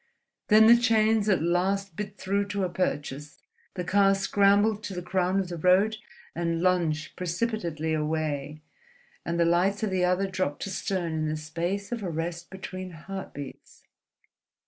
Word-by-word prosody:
Then 215 0 +7
the 235 +2 +8
chains 220 -2 +3
at 190 -5 +2
last 185 +2 0
bit 205 +1 -6
through 200 +1 -1
to 200 0 -2
a 185 - 0
purchase, 150 -5 -3 0.4
the 180 - -3
car 195 +2 +4
scrambled 205 +2 +3
to 195 - -5
the 180 - -3
crown 185 +1 +1
of 190 -2 -2
the 175 -2 -5
road 190 +6 +3 0.4
and 170 0 -1
lunged 165 -4 0
precipitately 175 -4 -2
away; 150 -1 -2 0.6
and 170 0 -2
the 170 - +4
lights 185 +5 +2
of 210 - 0
the 185 -1 +1
other 180 +2 +2
dropped 185 -7 -2
astern 185 -3 -2
in 155 -1 -1
the 155 0 -2
space 170 +7 -3
of 235 -2 -3
a 190 - -3
rest 170 +1 -4
between 185 -1 -7
heartbeats. 165 -5 -9
185 Hz, 160 wpm, -27 LUFS, 165-200 Hz, 0.6 s, the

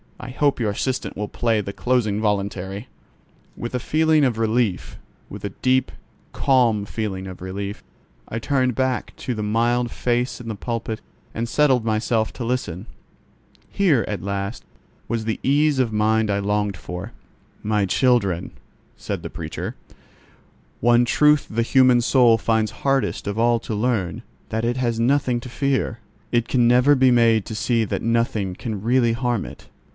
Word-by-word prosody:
I 125 - -7
hope 140 +1 +1
your 110 -3 0
assistant 130 +5 -3
will 105 +1 -3
play 115 0 0
the 100 0 -6
closing 110 -4 0
voluntary." 100 0 -2 0.7
With 120 - -6
a 125 - 0
feeling 155 +3 +2
of 125 -5 +1
relief—with 115 -3 -3
a - - -2
deep, 130 0 +1 0.4
calm 120 -6 +2
feeling 100 -3 -4
of 90 -1 -9
relief, 100 +2 -5 0.4
I 110 - -4
turned 130 +1 +1
back 130 -1 -1
to 125 - -3
the 105 - -3
mild 120 +3 +1
face 120 +1 -1
in 115 - -10
the 110 - -3
pulpit 115 0 -4 0.3
and 115 +1 -3
settled 130 -5 +3
myself 110 0 0
to 125 - -6
listen. 110 -7 -3 0.8
Here, 165 - +2
at 105 - -3
last, 100 +2 -3 0.4
was 115 -2 -2
the 110 - -2
ease 145 +1 +2
of 120 -4 +1
mind 110 0 +2
I 100 - +1
longed 105 -1 -1
for. 90 +6 -7 0.5
"My 105 -1 +1
children," 100 -5 +1 0.5
said - - -4
the - - -5
preacher, - - -6 1.1
"one 120 0 +5
truth 150 +4 +3
the 115 +2 0
human 125 0 +4
soul 120 -2 +5
finds 110 -1 0
hardest 135 0 -1
of 100 +1 -3
all 120 0 +3
to 115 - -5
learn: 105 -5 -1 0.3
that 110 +1 -1
it 120 +2 0
has 120 -3 -1
nothing 125 0 +2
to 125 - -9
fear. 135 -2 -1 0.3
It 120 -1 +1
can 120 -2 +3
never 125 +4 +5
be 130 -1 +4
made 115 -3 +4
to 110 - -6
see 115 0 +1
that - - -3
nothing 115 -5 0
can 110 -2 -5
really 120 0 +3
harm 120 -2 -1
it." - - -11
115 Hz, 160 wpm, -22 LUFS, 105-125 Hz, 1.1 s, one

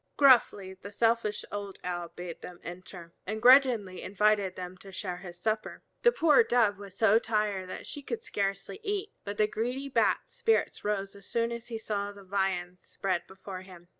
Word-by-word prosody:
Gruffly 235 -8 +5
the 190 +2 -10
selfish 225 -1 +1
old 200 -1 -5
Owl 175 -1 -3
bade 175 -2 -7
them 180 -1 -9
enter, 175 -1 -9
and 215 +2 -2
grudgingly 240 -6 +5
invited 200 -1 +2
them 180 0 -6
to 195 - -12
share 180 -1 -4
his 175 -1 -10
supper. 215 +3 -2 0.2
The 480 - +6
poor 455 0 +5
Dove 225 - +2
was 195 -2 -11
so 220 0 +5
tired 210 -5 -1
that - - -6
she 290 - -6
could 455 - -5
scarcely 195 - -2
eat, 415 -1 -2
but 205 0 -5
the 215 - +4
greedy 250 +6 -3
Bat's - - +1
spirits 450 0 +1
rose 200 -1 -2
as 200 0 -12
soon 235 0 0
as 235 0 -6
he 230 -2 -4
saw 205 -2 -3
the 200 -1 -13
viands 185 -2 -1
spread 185 -3 -2
before 190 -1 -8
him. 180 -2 -14
200 Hz, 185 wpm, -30 LUFS, 185-230 Hz, 0.2 s, The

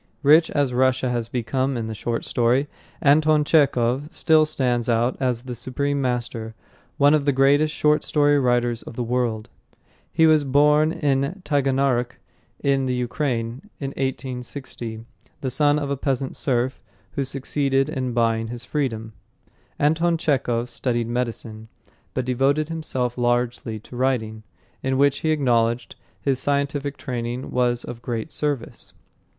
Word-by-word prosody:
Rich 155 +3 +6
as 140 -3 0
Russia 130 0 +2
has 120 -2 -2
become 130 +2 -1
in 115 - -3
the 110 - -4
short 115 +2 -3
story, 125 +4 +2 0.3
Anton 155 +1 +4
Chekhov 140 -3 +2
still 155 -2 +3
stands 125 -5 0
out 120 +2 +2
as 125 -3 -1
the 130 -1 -6
supreme 140 +4 -2
master, 120 -3 -3 0.4
one 145 +1 +5
of 150 -2 +2
the 145 - +4
greatest 140 +3 +3
short 150 +1 +2
story 145 -1 +3
writers 120 -2 +1
of - - -10
the 125 - -2
world. 120 -2 -1 0.6
He 160 -1 +4
was 155 -2 +5
born 150 +3 +4
in 145 +5 -1
Taganarok, 135 -4 +1 0.5
in 135 -1 +2
the 125 - 0
Ukraine, 125 - -2
in 135 - -3
1860, 125 -4 -5 0.4
the 130 - -2
son 145 +3 +3
of 140 -2 -2
a 140 - -1
peasant 135 -1 -2
serf 130 -1 0 0.3
who 140 - -2
succeeded 135 +1 0
in 130 -4 -3
buying 115 -1 +1
his 120 +1 -6
freedom. 115 -6 -2 0.6
Anton 165 +3 +2
Chekhov 125 -6 0
studied 120 -1 -2
medicine, 115 -2 -4 0.5
but 130 - -1
devoted 135 +5 +1
himself 130 -7 -3
largely 120 -2 0
to 120 - -12
writing, 120 -4 -1 0.4
in 130 -1 0
which, 140 0 +3
he 160 - -1
acknowledged, 120 -5 +1 0.2
his 135 -2 0
scientific 140 0 -1
training 120 -1 -4
was 120 -1 +1
of 120 -1 -8
great 120 +5 -4
service. 145 -5 -4
130 Hz, 145 wpm, -23 LUFS, 120-145 Hz, 0.6 s, Rich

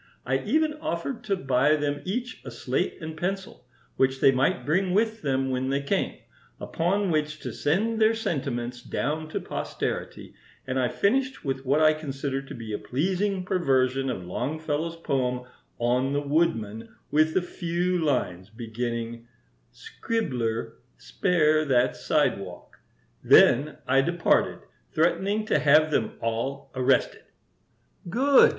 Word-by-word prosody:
I 130 +1 +1
even 305 - +1
offered 170 - -3
to 200 - +1
buy 135 -2 +2
them 145 -1 -2
each 245 +6 -4
a - - -7
slate - - -2
and 160 0 -6
pencil, 185 -5 -4 0.3
which 130 0 +2
they 135 - +6
might 125 -1 +1
bring 180 +5 +1
with 220 +1 +1
them 135 -3 0
when 130 +1 -1
they 140 +1 0
came, 140 - -1 0.4
upon 190 +3 0
which 155 -1 -1
to - - -5
send 220 +9 0
their 220 +1 +5
sentiments 125 - -3
down 155 +5 -3
to - - -2
posterity, - - -4 0.3
and 130 0 -1
I 125 - +2
finished 260 - 0
with 135 -1 -3
what 145 +4 +3
I 155 0 +6
consider 140 -3 -3
to 135 +1 -10
be 115 -3 -7
a 105 - -2
pleasing 185 +7 -1
perversion 135 -8 +1
of 90 -8 -4
Longfellow's 155 - -2
poem 130 -6 -1 0.4
on 125 +3 +1
the 145 - +1
Woodman, 125 -8 0 0.2
with 155 +1 +3
a - - +3
few 175 0 -1
lines 115 - -1
beginning: 115 +1 -5 0.4
"Scribbler, 120 - -3 0.2
spare 155 -4 +2
that 125 -3 +2
sidewalk. 100 - -1 0.4
"Then 145 +5 +5
I 135 +1 +4
departed, 170 +4 +1 0.3
threatening 195 +6 +1
to - - +2
have 155 +1 +5
them - - 0
all 120 +5 -3
arrested." 130 0 +1 0.9
"Good!" 270 +8 +6
145 Hz, 140 wpm, -26 LUFS, 130-175 Hz, 0.9 s, they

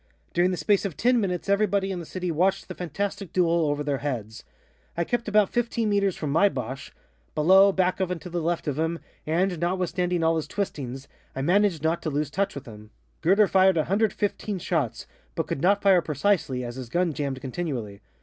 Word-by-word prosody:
During 175 +1 +3
the 180 - -2
space 205 +1 +2
of 190 -8 -4
ten 245 0 +3
minutes 180 -2 -2
everybody 200 -1 +1
in 185 - -3
the 170 - -8
city 180 -2 -3
watched 185 +5 +1
the 185 - -6
fantastic 195 +2 -4
duel 170 -3 +2
over 145 0 -1
their 145 -2 -1
heads. 115 -6 -4 0.5
I 170 - +2
kept 240 +6 -2
about 210 -1 +3
fifteen 235 -2 0
meters 200 -2 +1
from 150 -3 -3
my 165 +7 +4
Boche 130 - -6 0.4
below, 190 +5 +6
back 185 -1 +1
of 190 -2 0
and 180 -2 -3
to 180 - -8
the 175 0 -1
left 170 0 -1
of 145 0 -1
him, 165 +1 0 0.3
and, 175 +2 +1
notwithstanding 180 0 0
all 165 0 +3
his 160 - -3
twistings, 135 -9 -4 0.3
I 135 - -2
managed 180 -1 +2
not 160 +2 +1
to 155 - -2
lose 145 0 -2
touch 195 -2 -1
with 140 - -7
him. 105 -2 -12 0.3
Guerder 195 +5 +4
fired 190 -2 +4
115 205 +3 0
shots, 150 - -2 0.3
but - - -1
could 135 - -4
not 200 +3 +3
fire 190 -3 +5
precisely, 150 -5 0
as 120 +1 -6
his 130 -3 -7
gun 175 +4 +1
jammed 140 -2 -3
continually. 125 - -4
175 Hz, 200 wpm, -26 LUFS, 145-195 Hz, 0.5 s, below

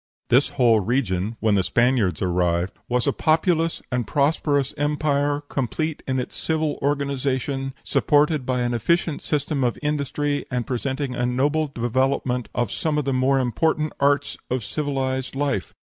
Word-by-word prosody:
This 130 +4 +4
whole 115 -3 +5
region, 105 -2 -1
when 110 -1 +3
the 100 - +3
Spaniards 115 - +1
arrived, 90 0 +1 0.2
"was 125 0 +1
a - - +2
populous 165 +1 +1
and 125 -4 -1
prosperous 145 +1 +1
empire, 145 -1 0
complete 145 +3 -3
in 130 -1 0
its 125 - -5
civil 155 -2 -1
organization, 135 -1 -1
supported 150 -1 +2
by 125 0 -1
an 120 0 0
efficient 165 +5 0
system 145 -2 -1
of 120 -2 0
industry, 145 0 -1
and 125 -2 -2
presenting 130 +1 -2
a 120 0 0
notable 145 +5 +1
development 125 0 -1
of 120 -4 0
some 155 -2 -1
of 150 - 0
the 135 - 0
more 130 +1 +3
important 150 +5 0
arts 140 0 +2
of 125 -2 -1
civilized 135 -2 -2
life." 135 -9 -2
135 Hz, 150 wpm, -23 LUFS, 125-145 Hz, 0.2 s, whole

